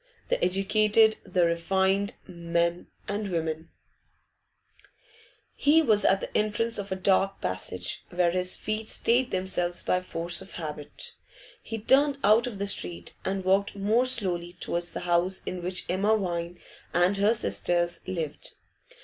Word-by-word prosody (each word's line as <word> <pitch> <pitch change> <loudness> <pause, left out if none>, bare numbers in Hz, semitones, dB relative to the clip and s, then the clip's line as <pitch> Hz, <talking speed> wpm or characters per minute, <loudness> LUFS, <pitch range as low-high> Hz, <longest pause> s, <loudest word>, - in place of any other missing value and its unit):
The - - 0
educated, 215 +3 +3
the 180 -2 +1
refined, 190 +4 +1
men 170 -1 -1 0.2
and 205 +1 -2
women 160 -1 -3 1.8
He 315 +3 +4
was 215 -7 +3
at 195 0 +3
the - - -7
entrance 215 +2 +1
of 200 -1 -6
a - - 0
dark 195 +1 +1
passage, 90 0 -3
where 175 -1 +1
his 180 +1 +1
feet 215 0 -4
stayed 245 +2 +2
themselves 185 -2 0
by 180 - +1
force 170 0 -1
of 190 - -11
habit. 150 -3 -6 0.5
He 225 - -5
turned 275 +6 +3
out 220 +4 +5
of 230 -5 -6
the 200 - -2
street, 90 - -2
and 190 0 -2
walked 195 +2 +2
more 215 +5 +2
slowly 180 -9 0
towards 175 -1 -2
the - - -4
house 180 +1 +1
in 180 - -4
which 180 +1 -2
Emma 200 +4 +2
Vine 175 -3 -3 0.4
and 175 +3 +3
her 210 +3 +3
sisters 175 -5 0
lived. 165 -5 -4
190 Hz, 145 wpm, -27 LUFS, 175-210 Hz, 1.8 s, out